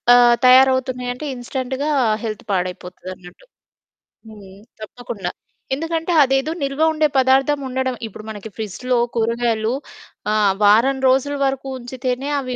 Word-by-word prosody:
ఆహ్, 240 -1 +6
తయారవుతున్నాయి 255 -1 +4
అంటే, 250 +5 -8
ఇన్స్‌టెన్ట్‌గా 260 +3 -4 0.3
హెల్త్ 215 -2 -5
పాడైపోతది 180 -1 -4
అన్నట్టు. 180 - -16 0.8
హ్మ్. 205 -3 -13 0.3
తప్పకుండా, 215 -3 -6 0.4
ఎందుకంటే 325 +4 -2
అదేదో 270 +3 +1
నిల్వ 275 +2 -2
ఉండే 310 -1 +2
పదార్థం 265 +2 +3
ఉండడం 260 0 -2
ఇప్పుడు 215 0 -11
మనకి 215 0 -7
ఫ్రిడ్జ్‌లో 235 +4 -2 0.2
కూరగాయలు 230 0 0 0.6
ఆహ్, 210 -2 +3
వారం 230 +7 +4
రోజుల 270 +2 +1
వరకు 270 0 -2
ఉంచితేనే, 255 +2 -4
అవి 255 -2 -4
250 Hz, 120 wpm, -20 LUFS, 220-265 Hz, 0.8 s, ఆహ్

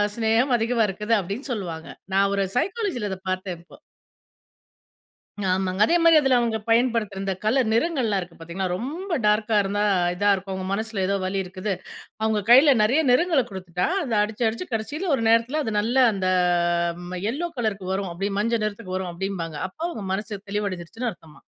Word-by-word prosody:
சிநேகம் 230 +3 +2
அதிகமா 230 0 +1
இருக்குது 210 +4 0
அப்பிடின்னு 205 +9 -5
சொல்வாங்க. 170 -6 -5 0.3
நான் 200 0 +4
ஒரு 195 -1 +1
சைக்காலஜில 375 - -1
அத 190 - -5
பாத்தேன், 185 -2 -3
இப்போ. - - -17 1.7
ஆமாங்க. 185 +1 -1
அதேமாரி 335 +2 +5
அதில 270 -2 +3
அவுங்க 230 -2 0
பயன்படுத்துற 225 -4 +1
இந்த 195 -1 -1
கலர், 240 +2 +2
நிறங்கள்லாம் 230 - +1
இருக்கு 175 -1 -10
பாத்தீங்கன்னா, 170 +3 -4
ரொம்ப 330 - -3
டார்க்கா 215 +1 +2
இருந்தா 205 +1 -1 0.3
இதா 205 +3 +2
இருக்கும், 195 0 -5
அவுங்க 190 0 -4
மனசுல 220 0 -2
ஏதோ 200 - +1
வலி 195 +1 -2
இருக்குது. 185 +2 -4 0.5
அவுங்க 220 -1 +1
கையில 270 +3 +8
நிறையா 255 +9 +3
நிறங்கள 320 0 +3
குடுத்துட்டா, 180 -2 -3 0.2
அத 245 - -4
அடிச்சு, 215 +2 -1
அடிச்சு 230 +11 -4
கடைசில 290 - -2
ஒரு 230 - -2
நேரத்துல 230 +7 +3
அது 220 - -2
நல்ல 230 +5 -1 0.2
அந்த 190 -2 -2 0.8
ம 180 -1 -4
யெல்லோ 305 +10 -2
கலருக்கு 210 -5 -2
வரும், 190 -1 -2
அப்பிடி 195 +4 -3
மஞ்ச 230 +3 +1
நிறத்துக்கு 200 -3 -4
வரும் 185 -1 -3
அப்பிடிம்பாங்க. 170 -4 -4
அப்போ 190 - -12
அவுங்க 215 -10 -6
மனசு 205 0 -5
தெளிவடஞ்சிருச்சுன்னு 205 +3 -3
அர்த்தமாம். 160 -3 -18
210 Hz, 165 wpm, -24 LUFS, 190-240 Hz, 1.7 s, கையில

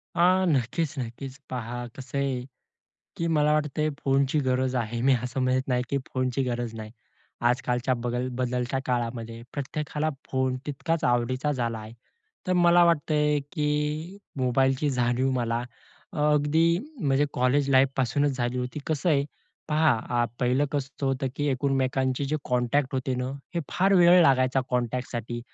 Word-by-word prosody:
अह, 185 +2 +4
नक्कीच-नक्कीच, 135 -3 -2
पहा 120 0 -4
कसं 135 +1 -6
आहे 135 -2 0 0.8
की 170 - -1
मला 150 0 +3
वाटतंय 150 0 0 0.2
फोनची 135 +2 +2
गरज 130 0 +1
आहे. 120 -1 -2
मी 135 +1 +5
असं 125 +2 -3
म्हणत 130 0 +2
नाही 125 -1 +1
की 140 - +1 0.2
फोनची 130 0 0
गरज 120 -2 -3
नाही. 110 -1 -7 0.6
आजकालच्या 125 0 0
बगल 120 +1 -2
बदलत्या 125 +1 -1
काळामध्ये 115 -2 -3
प्रत्येकाला 150 +2 -3 0.2
फोन 130 -1 0
तितकाच 160 +3 -2
आवडीचा 130 +4 +1
झाला 120 -4 -2
आहे. 110 +1 -9 0.5
तर 185 - +1
मला 175 -1 +5
वाटतंय 150 -2 +2
की 150 +4 -1 0.2
मोबाईलची 130 +2 +2
जाणीव 125 +1 +1
मला 120 -2 -1 0.5
अगदी 150 +1 +2 0.3
म्हणजे 140 -2 +2
कॉलेज-लाईफपासूनच 135 +1 +2
झाली 120 0 -1
होती. 125 +3 -4
कसं 155 +3 0
आहे 140 -2 +3 0.4
पहा, 155 0 +3 0.3
अ, - - +3 0.2
पहिलं 125 +3 +2
कसं 140 -1 -3
होतं 135 0 0
की 145 - -1
एकमेकांचे 130 0 0
जे 145 +3 -1
कॉन्टॅक्ट 125 +3 0
होते 130 0 -1
ना, 125 0 -2 0.3
हे 170 - 0
फार 195 +2 +2
वेळ 175 0 +7
लागायचा 130 -3 +3
कॉन्टॅक्टसाठी 120 -1 -2
130 Hz, 140 wpm, -26 LUFS, 125-150 Hz, 0.8 s, वेळ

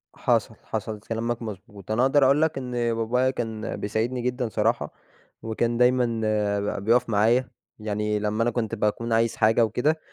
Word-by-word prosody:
حصل، - - 0
حصل 110 -1 -4
كلامك 115 +2 -3
مضبوط، 105 -1 -8
أنا 110 +3 +2
اقدر 135 +2 +4
اقول 140 +3 +4
لك 160 -2 +1
إن 125 -2 -5 0.2
بابايا 120 +3 +1
كان 115 -3 -4
بيساعدني 115 +5 -2
جدًا 125 -1 -2
صراحة، 110 -7 0 0.5
وكان 115 +1 -1
دايمًا 125 +1 +4 0.7
ب - - -9
بيُقف 120 +1 +3
معايا، 115 +4 +2 0.3
يعني 105 0 -1
لمّا 105 +2 0
أنا 120 - +1
كنت 115 -1 -2
باكون 115 +2 -1
عايز 115 0 +2
حاجة 110 +2 +4
وكده، 145 +9 0
115 Hz, 160 wpm, -25 LUFS, 110-125 Hz, 0.7 s, اقدر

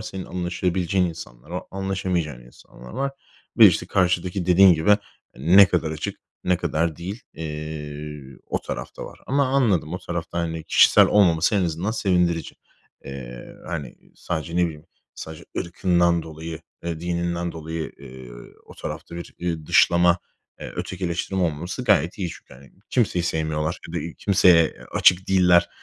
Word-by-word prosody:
Senin 95 -3 -6
anlaşabileceğin 90 +1 -1
insanlar 75 -5 -9
var, 90 +1 -4
anlaşamayacağın 95 -7 -2
insanlar - - -15
var. 135 +3 -2 0.5
Ve, 110 - +11
işte, 90 -2 +2
karşıdaki, 90 -1 0
dediğin 90 0 +7
gibi, 80 +6 +4 0.4
ne 90 +8 +7
kadar 80 - 0
açık, 80 0 -5 0.2
ne 90 -1 +3
kadar 85 -2 -1
değil, 95 +7 -6
eee, 75 -2 -6 0.2
o - - -1
taraf - - -6
da - - -6
var. - - -11
Ama 140 +1 +2
anladım, 115 - +1
o - - -3
tarafta, 85 -1 -4
hani, 80 -1 -3
kişisel - - +6
olmaması 85 -2 +3
en 100 - +3
azından 85 +5 -2
sevindirici. 90 -6 0 0.5
Eee, 60 -3 -9
hani, 80 -7 -5 0.2
sadece 85 0 -4
ne 90 - +4
bileyim, 80 -3 -6 0.3
sadece 80 0 -9
ırkından 85 -1 +1
dolayı, 80 +1 -8 0.2
eee, 85 -2 -3
dininden 85 0 -2
dolayı, 80 0 -5
eee, 65 -2 -11 0.4
o - - -13
tarafta 85 - -7
bir, 85 - -8
ııı, 80 -3 -3
dışlama, 85 0 +4 0.4
eee, - - -7
ötekileştirme 95 +1 -2
olmaması 85 +8 -3
gayet 95 -5 +2
iyi. 95 -3 -2
Çünkü, - - -13
hani, 65 0 -17 0.2
kimseyi 95 -8 +1
sevmiyorlar 80 0 -1
ya - - -9
da 85 0 -3
kimseye, 90 -4 +5
eee, - - -6
açık 90 +1 +4
değiller. 90 -2 +5
85 Hz, 150 wpm, -23 LUFS, 80-90 Hz, 0.5 s, Ve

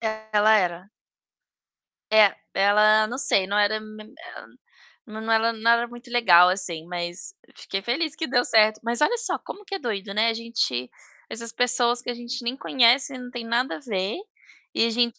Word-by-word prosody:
Ela 220 -1 +2
era. 180 0 -3 1.3
É, 210 -2 +5 0.2
ela 210 +2 +4
não 240 +3 -6
sei, 195 -7 +1
não 200 +2 -1
era 210 +1 +1
me 215 0 -12
hã, 330 +11 -13 0.6
nã 220 -1 -9
não 225 +1 -1
era 225 +1 +3
nada 235 +2 +2
muito 240 +1 -13
legal 180 -7 +5
assim, 180 -4 -3
mas 175 - -6 0.2
fiquei 195 - -5
feliz 290 +8 -2
que 320 - -4
deu 245 -1 +1
certo. 215 -1 +3
Mas 235 +1 0
olha 425 +11 +2
só 470 0 -2
como 415 - -11
que 395 0 -5
é - - -7
doido, 205 - -5
né. 215 +3 +2
A 225 - 0
gente 225 - -3 0.4
essas 230 0 -5
pessoas 240 0 +1
que 245 - -4
a - - -4
gente 240 +1 -7
nem 240 +2 -2
conhece, 260 +1 +2
não 250 -1 -9
tem 240 -2 -7
nada 240 +3 -1
a - - -12
ver 205 - -3 0.6
e 230 - +2
a - - -1
gente 235 0 0
230 Hz, 190 wpm, -24 LUFS, 210-245 Hz, 1.3 s, É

